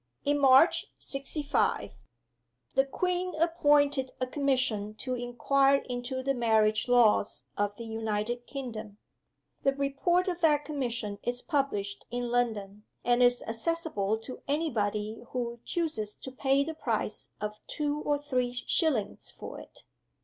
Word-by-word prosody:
In 290 0 +2
March, 270 +4 +6
'sixty 275 +2 -3
five, 285 - +1 0.8
the 270 - +3
Queen 360 +4 -1
appointed 290 -4 +3
a 255 - +1
Commission 255 -6 0
to 255 +3 -3
inquire 255 +3 +2
into 250 +1 -3
the 275 +1 +1
Marriage 220 -3 +2
Laws 240 -4 +3
of 205 0 -1
the 230 - -8
United 225 +2 -2
Kingdom. 225 -7 -6 0.6
The 275 0 +2
Report 280 +7 +1
of 355 -1 -2
that 295 -3 +4
Commission 240 -8 -3
is 245 0 -3
published 240 -10 -1
in 245 0 -3
London; 210 -4 -1 0.2
and 245 0 +3
is 245 0 +4
accessible 225 -3 -1
to 225 +3 -9
any 305 +3 0
body 210 0 -2
who 240 -1 -3
chooses 300 -12 -2
to 260 - -8
pay 270 +1 +2
the 320 +3 -4
price 320 - -3
of 210 0 -3
two 295 -1 -1
or 290 -1 +1
three 255 -4 -1
shillings 250 - +1
for - - -8
it. - - -14
255 Hz, 140 wpm, -29 LUFS, 225-290 Hz, 0.8 s, March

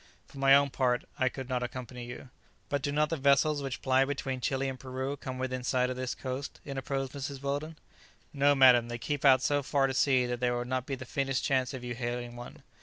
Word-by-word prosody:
For 140 - -13
my 135 0 +7
own 140 -1 +3
part, 125 -2 +1
I 130 - +3
could 130 0 -7
not 125 -1 -1
accompany 125 0 -6
you." 125 +1 -9 0.4
"But 145 -1 0
do 145 +1 -1
not 150 +1 +1
the 165 - 0
vessels 140 +2 +3
which 135 -2 -5
ply 130 0 +4
between 135 -2 -3
Chili 135 +1 0
and 130 -1 -5
Peru 130 +2 -4
come 130 -2 -6
within 130 -1 -3
sight 125 0 +1
of - - -4
this 130 -1 -3
coast?" 130 +1 -5
interposed 135 -1 -3
Mrs. 140 0 -5
Weldon. 145 +3 -3 0.6
"No, 145 0 +4
madam; 125 -3 +6
they 120 0 -4
keep 145 +4 -3
out 130 -2 +6
so 145 -1 +2
far 140 0 +1
to 135 - -1
sea 130 -1 +3
that 120 0 -3
there 120 -1 +1
would 120 0 -3
not 130 0 -2
be 135 - -2
the 130 - -9
faintest 135 0 -1
chance 130 -4 +1
of 130 -3 -7
your 120 -1 -4
hailing 120 0 -4
one." 120 0 -10
130 Hz, 235 wpm, -30 LUFS, 125-140 Hz, 0.6 s, my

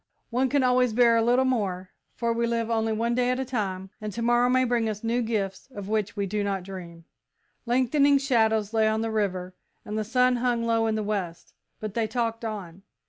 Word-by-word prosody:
One 255 +2 +1
can 280 0 +2
always 250 -2 +3
bear 235 0 +5
a 230 - +3
little 245 +3 +3
more, 190 -8 -1 0.2
for 235 -1 0
we 235 0 0
live 230 0 -1
only 225 -1 +1
one 230 +2 0
day 250 0 +1
at 255 +1 0
a 265 - -1
time, 195 -6 -3
and 215 0 -4
to 230 - -3
morrow 240 +1 +3
may 255 0 +3
bring 235 -3 +1
us 210 0 -5
new 235 +2 0
gifts 210 -2 -3
of 200 -1 -6
which 215 -1 -1
we 200 -2 -1
do 205 +2 -2
not 195 -2 -2
dream." 175 -3 -9 0.6
Lengthening 275 +4 +3
shadows 220 -6 +1
lay 220 -1 +3
on 220 0 +1
the 225 0 -2
river 185 -4 -2 0.3
and 215 +1 -3
the - - 0
sun 250 +3 +2
hung 240 -1 0
low 225 -1 +2
in 220 - 0
the 215 - -1
west, 185 -5 -4 0.3
but 215 -2 -5
they 225 -1 0
talked 230 0 -2
on. 195 -5 -6
225 Hz, 220 wpm, -26 LUFS, 205-245 Hz, 0.6 s, bear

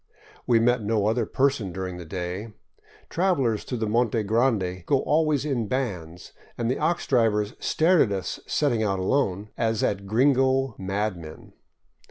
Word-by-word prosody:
We 120 - +4
met 120 +1 +2
no 105 -1 0
other 110 +1 +1
person 130 -8 0
during 95 0 -5
the 90 - -8
day. 95 +5 -5 0.5
Travelers 150 - 0
through 125 - -4
the 110 - -1
Monte 115 0 +1
Grande 105 -5 0
go 140 - +2
always 155 -2 +1
in 125 -7 -1
bands, 90 -10 -4 0.2
and 120 +1 0
the - - -2
ox 175 +1 0
drivers 110 -4 +1
stared 170 +2 +3
at 100 - +2
us 95 -2 -3
setting 130 -7 +1
out 100 -3 0
alone, 100 -1 0
as 110 -2 0
at 100 -1 -1
gringo 130 +2 +2
madmen. 95 -5 -4
110 Hz, 155 wpm, -25 LUFS, 100-130 Hz, 0.5 s, We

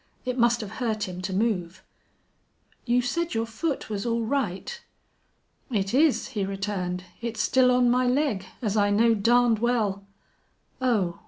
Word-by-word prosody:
It 250 -1 -1
must 235 -1 +3
have 210 - -7
hurt 220 -4 -1
him 180 0 -6
to 185 - -4
move. 190 -3 -1 1.0
"You 245 +1 +3
said 335 +4 -2
your 225 0 0
foot 275 +7 -3
was 205 -2 -3
all 235 -1 0
right." 275 - -2 0.9
"It 200 -4 -1
is," 290 0 +3
he 215 -7 -2
returned. 190 -2 -3 0.2
"It's 235 -1 -4
still 260 -1 +4
on 250 0 +4
my 250 0 +2
leg, 250 -6 +1 0.2
as 210 -2 0
I 205 -1 +3
know 225 +3 +4
darned 230 +1 +3
well." 215 -5 0 0.8
"Oh!" 205 -9 +1
230 Hz, 155 wpm, -26 LUFS, 200-250 Hz, 1.0 s, still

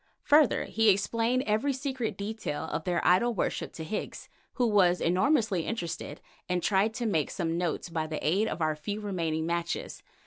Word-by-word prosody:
Further, 295 -2 +4
he 225 0 +2
explained 230 +5 +2
every 220 +7 +1
secret 260 -3 -3
detail 205 -7 -4
of 160 0 -4
their 180 -1 0
idol 230 +7 +4
worship - - -2
to 160 - -6
Higgs, 165 +7 -5 0.2
who 250 - +1
was 185 -5 +4
enormously 195 - +2
interested, 175 -8 -4 0.3
and 180 -1 0
tried 210 +3 +2
to 240 +1 -3
make 160 -9 +1
some 165 -3 -2
notes 175 -1 -2
by 160 -2 -2
the 155 -1 -3
aid 195 +7 +2
of 170 - -2
our 155 -1 +1
few 205 +8 -4
remaining 165 -6 -2
matches. 170 0 -3
195 Hz, 175 wpm, -29 LUFS, 170-225 Hz, 0.3 s, Further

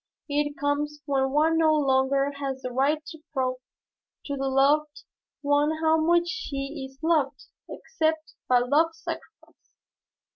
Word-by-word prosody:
It 290 0 -1
comes 295 +1 -1
when 270 -2 +1
one 315 +4 +2
no 315 -1 +4
longer 275 -1 +2
has 270 -2 -4
the 255 - -4
right 290 +5 +1
to 320 - -10
prove 255 -2 0 0.7
to 285 - -3
the 270 0 -2
loved 290 +3 +2 0.4
one 290 +2 +2
how 320 0 +3
much 345 +2 +3
she 280 -4 -4
is 265 - -22
loved, 310 -4 +1 0.3
except 315 -6 -2
by 250 -1 +4
love's 315 +6 +2
sacrifice. - - -9
290 Hz, 140 wpm, -26 LUFS, 270-315 Hz, 0.7 s, no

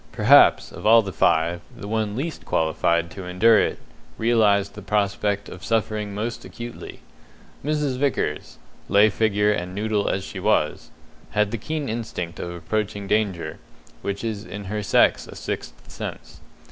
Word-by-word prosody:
Perhaps, - - +5
of - - -4
all 115 +1 +7
the 95 -2 -6
five, 85 +2 +2 0.2
the 100 - -7
one 110 -1 -1
least 155 +6 -4
qualified 85 +1 +1
to 95 - -8
endure 105 +5 +5
it - - 0 0.4
realized 105 -4 +3
the 105 - -9
prospect 100 0 0
of 90 - -10
suffering 105 -2 -1
most 115 +3 -4
acutely. 120 0 -9 0.6
Mrs. 150 -3 0
Vickers 130 - -1 0.3
lay 105 +2 +5
figure 105 -1 +2
and 90 -2 -3
noodle 105 0 0
as 95 - -1
she - - -7
was 75 - +1 0.5
had 105 -1 +3
the 115 - -2
keen 155 -2 -3
instinct 110 -7 -4
of 85 - -4
approaching 100 +4 -3
danger, 100 -4 -1 0.4
which 100 +2 -4
is 110 -3 -3
in 105 -1 -7
her 105 +2 -3
sex 100 - +3
a - - -10
sixth - - -5
sense. - - -8
105 Hz, 155 wpm, -23 LUFS, 95-110 Hz, 0.6 s, all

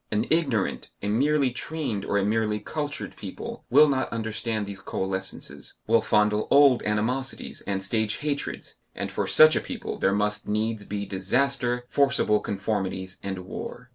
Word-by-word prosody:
An 105 +2 +1
ignorant, 135 - +1
a - - -1
merely 140 +4 +2
trained 125 -6 -3
or 100 - 0
a 100 - +2
merely 105 0 +1
cultured 145 +4 -4
people, - - -7
will 150 +4 +7
not 135 -2 0
understand 110 -1 -2
these 100 -1 -7
coalescences, 95 0 -4
will 115 0 +4
fondle 105 0 +2
old 140 -3 +6
animosities 115 +6 -2
and 95 -1 -1
stage 110 +2 0
hatreds, 145 -1 -4 0.2
and - - -4
for - - -2
such 155 0 +7
a - - +1
people - - -6
there 95 - +3
must 105 +1 0
needs 110 0 -1
be 100 0 -3
disaster, 120 +5 0
forcible 135 -7 +3
conformities 95 -2 -3
and 95 -2 -5
war. 125 +6 -7
110 Hz, 155 wpm, -26 LUFS, 100-130 Hz, 0.2 s, will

